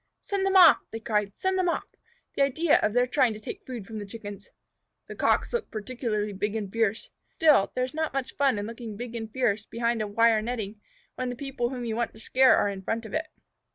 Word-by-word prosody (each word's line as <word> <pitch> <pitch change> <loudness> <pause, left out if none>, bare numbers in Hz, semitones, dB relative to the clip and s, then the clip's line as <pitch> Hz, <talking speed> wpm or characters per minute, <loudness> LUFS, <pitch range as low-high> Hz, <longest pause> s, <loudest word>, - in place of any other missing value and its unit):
"Send 390 -1 -1
them 390 - +1
off!" 350 -5 +9
they 225 - -6
cried. 210 -2 -1
"Send 375 0 0
them 360 -1 +2
off! - - -1 0.5
The - - -1
idea 295 +4 +3
of - - +1
their 245 +1 +4
trying 250 -2 +2
to 215 - -9
take 215 - -8
food 240 -6 -6
from 220 +1 -7
the 205 - -6
Chickens!" 205 -2 -9 0.6
The - - -8
Cocks - - +1
looked 475 - -2
particularly 215 -2 -3
big 205 +2 -2
and 205 -3 -4
fierce. 225 -2 0 0.2
Still, 300 -11 +4
there 255 - +1
is 255 - -9
not 315 0 -1
much 270 -2 -3
fun 275 -6 +2
in 205 - -3
looking 225 -2 -7
big 240 +1 -6
and 225 -2 -5
fierce 225 -4 0
behind 235 0 -1
a 215 - -1
wire 225 +1 +3
netting, 215 -3 -4 0.3
when 255 0 -3
the 245 - -4
people 265 -2 -3
whom 250 -2 -5
you 225 -1 -2
want 235 0 -1
to - - -13
scare 260 +3 +5
are - - +2
in 195 -1 -5
front 225 +4 -3
of - - -9
it. 315 0 -1
230 Hz, 235 wpm, -27 LUFS, 215-260 Hz, 0.6 s, off